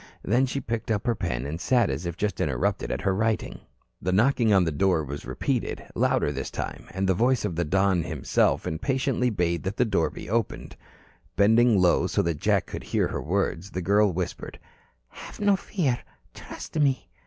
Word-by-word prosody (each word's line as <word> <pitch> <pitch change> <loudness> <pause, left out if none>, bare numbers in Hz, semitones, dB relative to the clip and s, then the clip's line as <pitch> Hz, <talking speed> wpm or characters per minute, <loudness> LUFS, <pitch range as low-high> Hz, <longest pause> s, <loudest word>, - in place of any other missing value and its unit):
Then 125 +6 +2
she 140 - -2
picked 115 -2 -4
up 105 -2 0
her 120 - +2
pen 70 - -3
and 80 +4 -5
sat 120 - +2
as 70 +6 -4
if 85 0 -5
just 105 -1 -2
interrupted 65 -5 -1
at - - -2
her 95 - +1
writing. 110 +2 -1 0.4
The 90 - -1
knocking 120 +3 +3
on 95 -3 +5
the 80 - 0
door 90 0 +2
was 70 0 -7
repeated, - - -2
louder 75 - +1
this 70 -1 -4
time, - - -6
and 95 +1 -2
the 95 - +4
voice 120 +4 +2
of 90 -5 -2
the 85 - 0
Don 95 +2 +2
himself 80 -5 0
impatiently 125 - 0
bade 85 -5 0
that 95 +2 -4
the 125 - +3
door 95 -7 +1
be - - -9
opened. 115 +2 -2 0.6
Bending 110 +1 +5
low 90 -1 +3
so - - +1
that 85 -3 -2
Jack - - +2
could - - -7
hear - - 0
her - - -3
words, 95 +1 -1
the 95 - -4
girl 100 +2 +3
whispered: 90 0 -5 0.5
"Have - - -11
no 205 -1 +4
fear. 155 - -1 0.3
Trust 160 - -7
me." 135 -3 +1
100 Hz, 195 wpm, -26 LUFS, 85-120 Hz, 0.6 s, on